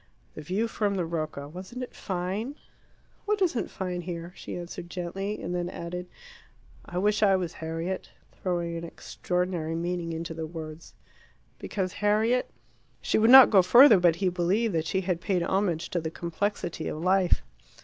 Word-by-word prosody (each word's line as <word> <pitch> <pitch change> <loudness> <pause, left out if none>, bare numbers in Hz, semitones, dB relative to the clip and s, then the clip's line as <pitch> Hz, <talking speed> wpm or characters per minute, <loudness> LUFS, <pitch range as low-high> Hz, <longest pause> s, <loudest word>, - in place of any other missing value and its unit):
"The - - -8
view 190 +9 -1
from 205 -3 -1
the 180 -3 -1
Rocca 155 -4 -4
wasn't 185 - -7
it - - -8
fine?" 195 +8 -3 0.7
"What 420 0 +1
isn't 335 -11 0
fine 180 -2 -4
here?" 170 0 -6
she - - -7
answered 175 0 -7
gently, 190 +4 -4
and - - -4
then 175 0 -2
added, 180 0 -6 0.8
"I 175 - -7
wish 210 +3 +2
I 195 -2 +5
was 180 -3 -2
Harriet," 165 +3 -4 0.2
throwing 175 -2 -2
an 165 - -6
extraordinary 175 -1 -3
meaning 170 0 -2
into 165 +1 -4
the 160 0 -5
words. 160 0 -9 0.6
"Because 185 -3 -3
Harriet 220 +4 +2 0.3
?" 120 +3 -38
She - - +2
would 225 +1 +4
not 265 0 +10
go 195 -3 +7
further, 235 +3 +8
but 175 -2 +4
he 185 +1 +1
believed 185 +5 +1
that 160 -1 0
she 190 - 0
had 180 -2 -2
paid 185 -3 0
homage 185 -3 0
to 175 - 0
the 160 - -3
complexity 170 0 -3
of - - -3
life. 185 +2 +2
180 Hz, 170 wpm, -27 LUFS, 170-200 Hz, 0.8 s, not